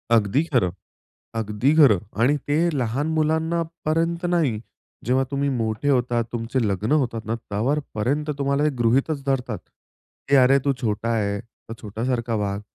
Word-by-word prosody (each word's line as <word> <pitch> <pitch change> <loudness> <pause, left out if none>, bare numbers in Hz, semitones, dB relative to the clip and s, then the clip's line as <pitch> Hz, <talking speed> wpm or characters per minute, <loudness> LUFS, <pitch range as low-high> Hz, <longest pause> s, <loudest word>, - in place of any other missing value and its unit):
अगदी 110 +8 +2
खरं. 125 - +1 0.7
अगदी 110 +6 +1
खरं. 120 - +7 0.2
आणि 140 +5 +4
ते 145 - +2 0.3
लहान 125 +6 -1
मुलांनापर्यंत 165 +1 0
नाही. 155 -11 +1 0.4
जेव्हा 130 +3 +2
तुम्ही 140 0 0
मोठे 110 +4 -1
होतात, 120 -3 +2
तुमचे 120 +2 -2
लग्न 100 +7 -1
होतात 115 -3 -4
ना 115 - -1
त्यावरपर्यंत 130 +5 -2
तुम्हाला 140 +1 +1
ते 150 - +4
गृहीतच 135 +5 +1
धरतात 135 -3 -1 0.7
की 140 - +5
"अरे 135 +2 +5
तू 140 - +3
छोटा 110 +1 -1
आहे, 100 -2 0
तर 115 0 -13
छोटासारखा 115 +2 -2
वाग." 100 +1 -3
125 Hz, 140 wpm, -23 LUFS, 110-145 Hz, 0.7 s, खरं